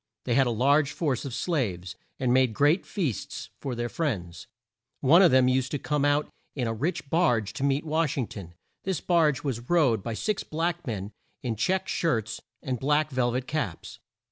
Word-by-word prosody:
They 120 - +1
had 130 +1 +4
a - - +1
large 140 +5 +3
force 140 -7 -1
of 135 - -5
slaves, 95 - -2 0.2
and 125 -2 +2
made 130 -4 +3
great 145 - +3
feasts 155 - -3
for 130 -3 -4
their 120 0 -2
friends. 90 - -3 0.5
One 155 +7 +6
of 180 - +7
them 130 -2 +5
used 130 0 +1
to - - +1
come 145 0 0
out 145 +1 +2 0.3
in 125 -4 -1
a 115 - -1
rich 160 +7 -2
barge 125 - +2
to 140 - -4
meet 140 +2 +1
Wash 155 -1 0
ing 130 - +1
ton. 90 -6 -10 0.3
This 190 -5 -1
barge 160 -6 +2
was 125 -4 -4
rowed 145 - +3
by 115 +2 -4
six 215 - -1
black 170 +1 -2
men 105 -3 -4 0.3
in 120 -3 -1
check 185 - 0
shirts 115 -10 -1 0.2
and 130 -2 -2
black 150 +2 +1
vel 125 -2 +1
vet 125 0 -2
caps. 145 - -4
135 Hz, 195 wpm, -27 LUFS, 120-155 Hz, 0.5 s, of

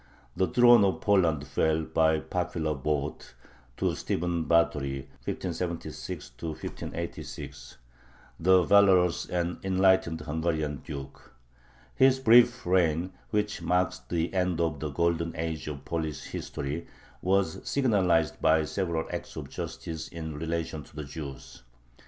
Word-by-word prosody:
The 95 - +2
throne 120 -3 +6
of 95 -1 +1
Poland 85 -8 +2
fell, 80 +1 +1
by 80 0 +2
popular 85 -3 -2
vote, 75 +1 -3 0.4
to - - +1
Stephen 85 -1 -2
Batory 70 -5 +1 0.2
(1576 85 -7 -4
1586), 85 0 -6 0.6
the 95 +2 +5
valorous 95 -3 +4
and 85 0 -2
enlightened 95 -4 +3
Hungarian 80 -1 -1
duke. 70 -2 -9 0.6
His 130 0 +5
brief 120 0 +5
reign, 90 0 +2 0.2
which 105 -1 -1
marks 90 +1 +1
the 85 +1 -1
end 90 -2 0
of 80 -4 0
the 75 - -3
"golden 85 +2 0
age" 80 -1 -3
of 70 -2 -6
Polish 80 -3 -3
history, 75 +5 -5 0.3
was 95 -2 +1
signalized 95 - +2
by 80 0 +4
several 85 -1 -2
acts - - -5
of - - -6
justice 80 -1 -5
in 80 -2 -6
relation 80 0 -3
to 75 - -16
the 75 - -4
Jews. 70 -4 -8
85 Hz, 120 wpm, -28 LUFS, 80-90 Hz, 0.6 s, throne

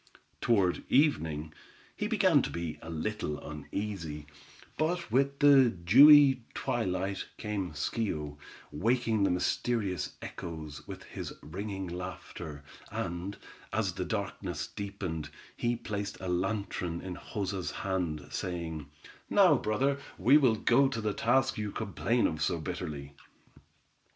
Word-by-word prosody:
Toward 100 -6 +2
evening 80 - +2 0.4
he - - -2
began - - +4
to - - -3
be 85 -2 -4
a 80 - -9
little 80 -1 -2
uneasy, 75 0 -5 0.5
but 170 +3 -1
with 140 +2 +2
the 140 -3 +7
dewy 135 - +7
twilight, 95 -3 -1
came 100 -6 -3
Schio, 75 -3 -2 0.3
waking 115 +5 +1
the 100 - +4
mysterious 95 +2 0
echoes, 80 -3 -7
with - - -8
his - - -7
ringing 95 +4 -5
laughter, 90 -4 -7 0.3
and, 85 +4 -4 0.3
as - - 0
the - - -3
darkness - - -3
deepened, 95 -7 -5 0.3
he 120 0 0
placed 105 -3 -4
a 95 - -5
lantern 90 -2 -1
in 95 -1 -5
Joza's 95 -2 -3
hand, 90 -6 -2
saying: 80 -5 -4 0.4
"Now, 190 -6 +6
brother, 135 +5 +1 0.2
we 130 +5 +5
will 130 -7 +5
go 125 +5 +4
to 115 - -3
the 105 -2 -1
task 130 +2 +2
you 105 -1 -2
complain 115 +3 0
of 80 -1 -1
so - - +1
bitterly." 70 -2 -5
100 Hz, 125 wpm, -31 LUFS, 85-115 Hz, 0.5 s, the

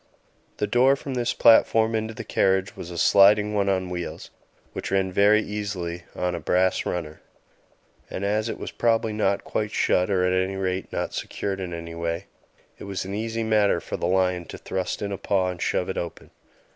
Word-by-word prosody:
The - - 0
door 125 +6 +4
from 135 0 -6
this 120 -1 -1
platform 115 -1 +5
into 110 0 -2
the - - -6
carriage 95 +1 +1
was 85 - -8
a 85 - -7
sliding 105 +3 +5
one 100 -1 +1
on 95 -1 0
wheels, 90 -1 -6 0.4
which - - -5
ran 95 -1 +1
very 105 +3 +4
easily 95 -5 -4
on 90 0 -1
a - - -3
brass 95 +1 +1
runner; 80 -3 -4 0.9
and 95 - -4
as 105 +2 0
it - - -4
was - - -6
probably 115 -2 +1
not 105 -2 0
quite 105 -1 -2
shut, 90 -3 +1
or 95 -2 +2
at 90 - +2
any 95 +1 0
rate 95 -1 -2
not - - -3
secured 95 -1 -4
in 90 -2 -5
any 85 0 -6
way, 85 +2 -3 0.5
it - - -8
was 95 -2 -4
an 95 - -5
easy 115 +2 -2
matter 110 -2 +3
for - - -6
the - - -2
lion 90 -1 +1
to - - -9
thrust 95 +2 -3
in 100 - -3
a 100 - -4
paw 95 -2 +1
and 90 -1 -6
shove 90 - 0
it 95 - -2
open. 85 -1 -7
95 Hz, 200 wpm, -25 LUFS, 90-105 Hz, 0.9 s, platform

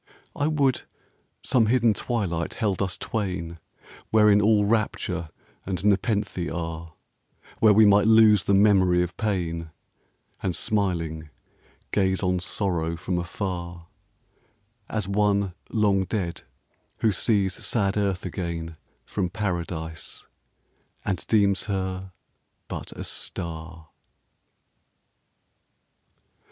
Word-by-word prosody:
I 145 - 0
would 140 -5 +2 0.6
some 125 -4 +3
hidden 115 -1 +4
twilight 95 -8 -2
held 100 -5 -1
us 95 -3 -1
twain 90 -6 -3 0.5
Wherein 105 -2 +5
all 105 0 +4
rapture 100 -6 -1 0.3
and 95 0 -3
nepenthe 100 -3 +1
are; 80 -1 -5 0.6
Where 110 - +6
we 110 +1 +6
might 105 +1 +5
lose 110 -3 +6
the 100 - +3
memory 95 -3 +4
of 90 - -5
Pain, 85 -6 -2 0.7
And 90 -3 -1
smiling, 85 -7 -1 0.6
gaze 95 -1 +1
on 90 -1 +1
Sorrow 85 -3 -1
from 90 0 -2
afar, 85 -1 -5 1.0
As 105 -3 -2
one 100 -1 +1 0.2
long 100 -4 +2
dead, 90 -4 -3 0.6
who 110 - +4
sees 100 -2 +1
sad 100 -4 +1
Earth 100 -3 -1
again 85 -2 -4 0.3
From 95 -4 -2
Paradise, 85 -5 -4 0.8
and 95 - -1
deems 100 -3 +3
her 95 -2 -3 0.6
but - - -6
a - - -7
star. 80 -1 -6
95 Hz, 105 wpm, -25 LUFS, 85-105 Hz, 1.0 s, Where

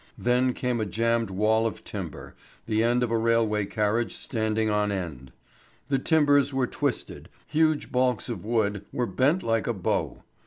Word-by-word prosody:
Then 125 +1 +2
came 125 -2 -1
a - - 0
jammed 115 +1 0
wall 110 +4 +2
of 110 - -7
timber, - - -7 0.3
the 110 -1 +1
end 120 +2 +2
of 120 - -1
a 115 - +2
railway 110 -3 +1
carriage 110 +2 0
standing 110 -2 -1
on 105 -1 +1
end. 80 -10 -5 0.6
The 135 -1 +2
timbers 145 -2 +3
were 135 -1 +1
twisted, - - -3 0.2
huge 155 -1 +1
baulks 125 0 +1
of 120 - -5
wood 105 -3 0
were 125 - -1
bent 130 - +1
like 115 -1 0
a 120 - +1
bow. 95 -5 -2
115 Hz, 165 wpm, -26 LUFS, 105-125 Hz, 0.6 s, timbers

